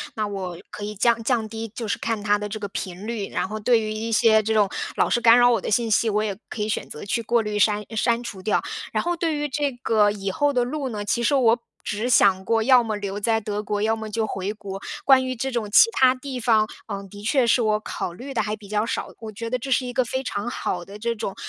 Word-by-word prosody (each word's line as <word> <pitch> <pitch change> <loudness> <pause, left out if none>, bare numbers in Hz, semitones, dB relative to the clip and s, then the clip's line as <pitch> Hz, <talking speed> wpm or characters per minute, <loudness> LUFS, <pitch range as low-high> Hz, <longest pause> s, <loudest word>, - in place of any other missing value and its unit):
那 215 - -1
我 190 -4 -5
可 205 - -6
以 210 0 -5
降 235 +3 +2
降 225 -2 0
低， 225 0 -5
就 235 - -4
是 205 - -1
看 225 -3 -2
它 205 0 +3
的 210 - -4
这 210 +1 -5
个 205 -2 -5
频 185 0 -6
率， 225 -4 -3
然 - - -2
后 215 - -4
对 230 +2 +3
于 215 0 -3
一 225 +1 -3
些 220 0 +5
这 220 +1 -1
种 210 -2 +3 0.3
老 - - +2
是 - - +2
干 230 0 +7
扰 245 0 +6
我 235 - +3
的 - - -4
信 225 +1 +1
息， 225 +2 +3
我 210 0 +1
也 210 - -1
可 215 - -6
以 210 - -1
选 - - -2
择 150 - -8
去 220 +4 -1
过 235 +1 +2
滤 210 -1 -2
删 210 +1 +3
删 235 +2 +1
除 195 -5 -7
掉。 210 - +1 0.3
然 - - 0
后 345 0 -1
对 330 -2 0
于 295 0 -2
这 285 0 -1
个 210 -2 +3
以 195 -1 -3
后 290 +8 +1
的 250 -2 +2
路 270 +2 -3
呢， 210 -4 -4
其 235 +3 0
实 280 +5 +2
我 240 -3 +4 0.2
只 215 +4 -2
想 190 -5 +4
过 225 -1 +2
要 255 0 +6
么 220 -2 -2
留 200 -1 -4
在 225 +2 +1
德 210 0 -3
国， 210 0 -2
要 220 +1 +1
么 220 -1 -6
就 220 +1 -1
回 195 -1 -3
国， 195 -2 -7 0.2
关 265 -1 +5
于 255 0 -3
这 265 +3 -3
种 230 -4 -2
其 240 - +7
它 260 - +4
地 260 0 -6
方， 220 -2 +3 0.2
呃， 200 -2 -5
的 205 - -10
确 245 +4 +2
是 235 +1 +3
我 215 -1 +2
考 180 - -4
虑 265 +9 -8
地 - - +1
还 210 0 -2
比 205 -2 -14
较 210 +1 0
少， - - -3
我 225 - -7
觉 230 +2 -5
得 255 - -1
这 270 - -6
是 255 0 +2
一 250 - -4
个 250 +1 +1
非 260 +3 -3
常 205 -1 -3
好 175 -6 -3
的 200 +3 -10
这 235 +2 -1
种， 200 -3 -4
220 Hz, 295 characters per minute, -23 LUFS, 205-240 Hz, 0.3 s, 干